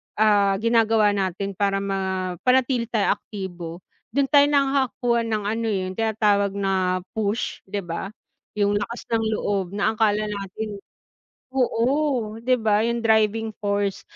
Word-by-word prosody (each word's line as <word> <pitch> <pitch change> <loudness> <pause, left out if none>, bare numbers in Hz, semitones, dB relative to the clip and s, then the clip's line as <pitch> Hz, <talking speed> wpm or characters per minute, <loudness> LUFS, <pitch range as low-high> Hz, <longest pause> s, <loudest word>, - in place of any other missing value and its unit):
ah, 205 -2 +4
ginagawa 225 -2 +4
natin 195 0 -2
para 195 0 0
mapanatili 195 +6 0
tayong 220 -3 +1
aktibo. 175 -4 -7 0.3
Do'n 280 0 +1
tayo 285 -1 +6
nakakakuha 270 -4 +1
ng 215 -2 -1
ano, 225 +3 -2
eh, 205 -3 0
'yun - - -7
tinatawag 205 -3 +2
na 185 -2 0
push 215 +1 -2
'di 200 0 -3
ba, 170 +2 -4 0.5
'yung 205 0 +2
lakas 230 +4 -5
ng 225 -1 +2
loob 195 -2 -2
na 205 +2 +1
akala 215 -1 +1
natin. 205 0 -5 0.7
Oo 250 -2 0
'di 255 +1 +2
ba, 215 -2 +2
'yung 235 0 -1
driving 220 0 +2
force, 200 -1 -1
210 Hz, 135 wpm, -23 LUFS, 200-230 Hz, 0.7 s, tayo